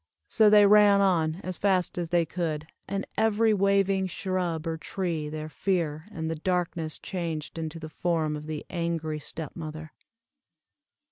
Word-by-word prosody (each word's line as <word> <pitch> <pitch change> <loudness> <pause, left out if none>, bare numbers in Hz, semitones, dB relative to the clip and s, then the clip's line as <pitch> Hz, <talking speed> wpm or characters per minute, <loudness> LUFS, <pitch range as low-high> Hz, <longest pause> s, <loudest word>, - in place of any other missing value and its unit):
So 215 -2 +5
they 210 -1 +7
ran 205 -1 +7
on 165 -5 +2
as 185 -2 -5
fast 190 -3 +2
as 170 -2 -3
they 170 -1 +3
could, 155 -2 -3 0.2
and 195 0 -2
every 220 0 +3
waving 195 -1 +2
shrub 180 -3 -2
or 165 -1 -1
tree 165 -2 -3
their 155 0 -5
fear 160 -1 -1
and 160 -6 -4
the 160 - -1
darkness 170 -1 -1
changed 165 -3 -4
into 160 0 -4
the 155 - -7
form 160 -1 -1
of 150 0 -7
the 155 -1 -5
angry 165 -3 -2
step 155 0 -7
mother. 155 -1 -7
170 Hz, 155 wpm, -27 LUFS, 155-190 Hz, 0.2 s, they